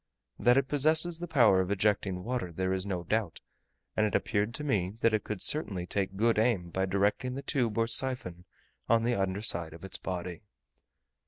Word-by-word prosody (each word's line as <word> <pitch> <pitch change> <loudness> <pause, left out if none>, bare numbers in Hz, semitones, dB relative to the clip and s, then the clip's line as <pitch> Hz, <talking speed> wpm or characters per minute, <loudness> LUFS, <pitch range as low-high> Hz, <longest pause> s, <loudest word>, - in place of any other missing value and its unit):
That 125 +1 +4
it 135 -1 +2
possesses 155 +4 +3
the 175 - -5
power 115 - +4
of 95 - -3
ejecting 100 -2 0
water 120 -6 -3
there 95 +3 -2
is 95 +1 -2
no 90 -3 -3
doubt, 105 -1 -2 0.6
and 110 - +2
it 105 - 0
appeared 105 +1 0
to 150 - -3
me 100 -10 -1
that 115 - +3
it 110 - 0
could 105 -3 -4
certainly 100 - 0
take 95 +1 -2
good 115 +1 +2
aim 105 -7 0
by 95 +2 -1
directing 100 +6 0
the 140 - -6
tube 120 -7 -1
or 115 - +3
siphon 115 -8 0 0.4
on 115 0 +3
the 120 +1 +1
under 95 -1 -2
side 85 -6 +1
of 85 +3 -11
its 95 - -4
body. 90 -2 -5
105 Hz, 195 wpm, -29 LUFS, 95-120 Hz, 0.6 s, That